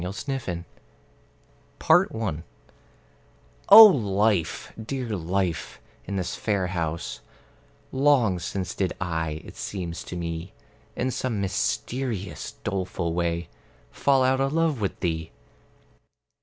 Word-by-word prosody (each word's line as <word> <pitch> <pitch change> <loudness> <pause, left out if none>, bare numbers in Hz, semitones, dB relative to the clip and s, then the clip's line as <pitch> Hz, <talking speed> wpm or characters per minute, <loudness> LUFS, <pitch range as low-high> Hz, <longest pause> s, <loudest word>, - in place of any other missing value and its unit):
The 90 - -3
Faithless 105 -7 -4 1.2
Lover 110 -9 +3
I - - -11 1.3
O 220 +3 +13
Life, 105 - +1
dear 125 +1 -4
Life, 85 -6 -2 0.3
in 100 - -4
this 90 -3 -2
fair 100 -4 0
house 85 -2 -3 0.7
Long 130 -9 +3
since 90 +1 -4
did 95 -2 -1
I, 80 -3 -3
it - - -11
seems 90 -4 -5
to - - -7
me, 85 +1 -5 0.4
In 130 +1 -1
some 120 -4 -2
mysterious 100 - -2
doleful 90 -3 -2
way 85 -1 -1 0.4
Fall 135 -2 +2
out 130 +1 +2
of 135 +1 0
love 160 -6 +1
with 100 - -2
thee. 80 -3 -2
95 Hz, 115 wpm, -25 LUFS, 85-125 Hz, 1.3 s, O